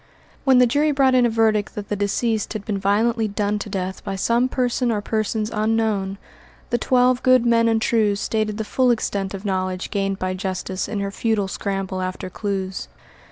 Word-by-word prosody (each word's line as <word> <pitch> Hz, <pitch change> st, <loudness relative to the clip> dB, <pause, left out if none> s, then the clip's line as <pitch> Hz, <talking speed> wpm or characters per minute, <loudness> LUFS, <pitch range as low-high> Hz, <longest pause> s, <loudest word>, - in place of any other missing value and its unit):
When 265 Hz, -2 st, +5 dB
the 250 Hz, -, +7 dB
jury 290 Hz, +6 st, +2 dB
brought 275 Hz, -2 st, +3 dB
in 250 Hz, -1 st, +5 dB
a -, -, 0 dB
verdict 220 Hz, -2 st, +1 dB
that 205 Hz, -1 st, -6 dB
the 205 Hz, -, 0 dB
deceased 210 Hz, +2 st, -1 dB
had 210 Hz, -2 st, -5 dB
been 205 Hz, -2 st, -2 dB
violently 220 Hz, +3 st, +1 dB
done 205 Hz, 0 st, -1 dB
to 205 Hz, -, -6 dB
death 190 Hz, -1 st, -4 dB
by 195 Hz, -, -4 dB
some 235 Hz, +6 st, +1 dB
person 250 Hz, -1 st, 0 dB
or 215 Hz, -, 0 dB
persons 215 Hz, +1 st, -2 dB
unknown, 215 Hz, -3 st, 0 dB, 0.5 s
the 240 Hz, -, +1 dB
twelve 250 Hz, +1 st, +3 dB
good 255 Hz, -2 st, +4 dB
men 230 Hz, -1 st, +4 dB
and 225 Hz, -1 st, +2 dB
true 220 Hz, -2 st, +2 dB
stated 215 Hz, 0 st, -1 dB
the 220 Hz, -, -2 dB
full 255 Hz, +4 st, +1 dB
extent 200 Hz, -4 st, -1 dB
of 195 Hz, +2 st, -9 dB
knowledge 185 Hz, -1 st, -2 dB
gained 195 Hz, -1 st, -1 dB
by 185 Hz, 0 st, -2 dB
Justice 185 Hz, 0 st, -3 dB
in 210 Hz, -2 st, -3 dB
her 200 Hz, 0 st, -3 dB
futile 210 Hz, -1 st, 0 dB
scramble 195 Hz, -1 st, -3 dB
after 185 Hz, 0 st, -4 dB
clues. 190 Hz, -2 st, -3 dB
210 Hz, 195 wpm, -22 LUFS, 195-230 Hz, 0.5 s, the